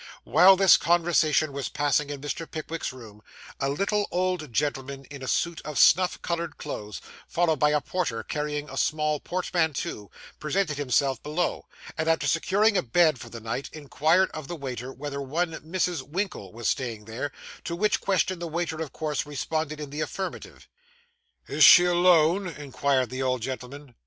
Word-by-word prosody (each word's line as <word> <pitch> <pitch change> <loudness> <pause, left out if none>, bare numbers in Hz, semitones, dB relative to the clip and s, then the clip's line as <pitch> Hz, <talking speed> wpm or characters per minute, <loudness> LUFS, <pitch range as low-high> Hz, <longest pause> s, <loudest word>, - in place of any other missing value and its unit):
While 190 +2 +6
this 190 -1 +7
conversation 160 -3 +2
was 140 -1 -3
passing 145 0 0
in 145 -2 -6
Mr. 155 +3 -5
Pickwick's 160 0 -4
room, 110 -5 -13 0.4
a 135 - 0
little 200 +7 0
old 180 -5 -1
gentleman 135 +1 -2
in 140 -1 -8
a 130 - -6
suit 170 +4 0
of 150 -2 -6
snuff 180 +2 +5
coloured 170 -2 -3
clothes, 105 -5 -6 0.3
followed 165 -4 +1
by 150 - +4
a 150 0 +2
porter 140 -11 -2
carrying 150 +2 -3
a - - -8
small 150 -1 0
portmanteau, 160 - -2 0.3
presented 155 -1 -1
himself 135 -1 +1
below; 155 +4 -2 0.3
and, 155 - 0
after 165 0 +2
securing 200 +5 +2
a - - +3
bed 155 +1 +3
for - - -9
the 115 - -8
night, 115 +4 -4
inquired 155 +5 +1
of 155 -3 -7
the 175 - -5
waiter 130 -4 -6
whether 140 +1 -6
one 165 +6 -1
Mrs. 175 -1 -2
Winkle 180 +9 -4
was 115 0 -4
staying 115 -5 -2
there, 120 +6 -4 0.3
to 170 - -3
which 210 +4 +1
question 185 -2 0
the 170 - -4
waiter 165 -1 -3
of 155 - -5
course 155 -1 -3
responded 155 +1 -3
in 145 -2 -7
the 150 +2 -4
affirmative. 190 +4 -6 0.8
'Is - - +2
she 175 - +9
alone?' 175 +1 +4
inquired 140 -4 -1
the 130 +1 -4
old 130 -3 0
gentleman. 130 +1 -7
150 Hz, 170 wpm, -26 LUFS, 135-175 Hz, 0.8 s, she